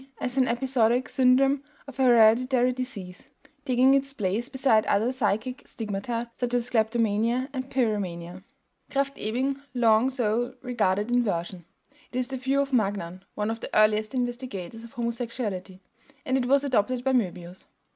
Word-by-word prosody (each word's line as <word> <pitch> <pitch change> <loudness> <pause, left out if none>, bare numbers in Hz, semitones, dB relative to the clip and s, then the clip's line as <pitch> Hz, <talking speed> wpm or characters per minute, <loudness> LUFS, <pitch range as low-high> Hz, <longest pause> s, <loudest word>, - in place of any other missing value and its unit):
as 250 0 -3
an 260 -2 +3
episodic 245 0 +1
syndrome 270 +2 +3 0.2
of 275 -2 -12
a - - +3
hereditary 245 +1 +5
disease, 215 -5 -7 0.4
taking 260 0 +4
its 275 0 +1
place 210 +5 -1
beside 265 -5 +3
other 220 +5 +2
psychic 250 0 -1
stigmata, 225 +2 -4
such 245 -1 -1
as 245 -1 -1
kleptomania 225 +2 +1
and 260 0 -4
pyromania. 185 -8 -2 0.5
Krafft 275 0 0
Ebing 260 +6 -2
long 230 +1 +4
so 245 0 -1
regarded 210 -3 0
inversion; 185 -7 -1 0.5
it 250 - -4
is 255 0 -1
the 265 - -3
view 265 +2 0
of 275 -1 -3
Magnan, 195 -5 -1
one 210 +1 -1
of 225 - -5
the - - -6
earliest 215 +3 +3
investigators 240 -5 -4
of 235 - -12
homosexuality; 230 -6 -4 0.4
and 260 - 0
it 255 -2 +1
was 275 +2 +3
adopted 250 -1 0
by 265 0 +1
Möbius. 180 -6 -2
240 Hz, 150 wpm, -26 LUFS, 210-255 Hz, 0.5 s, hereditary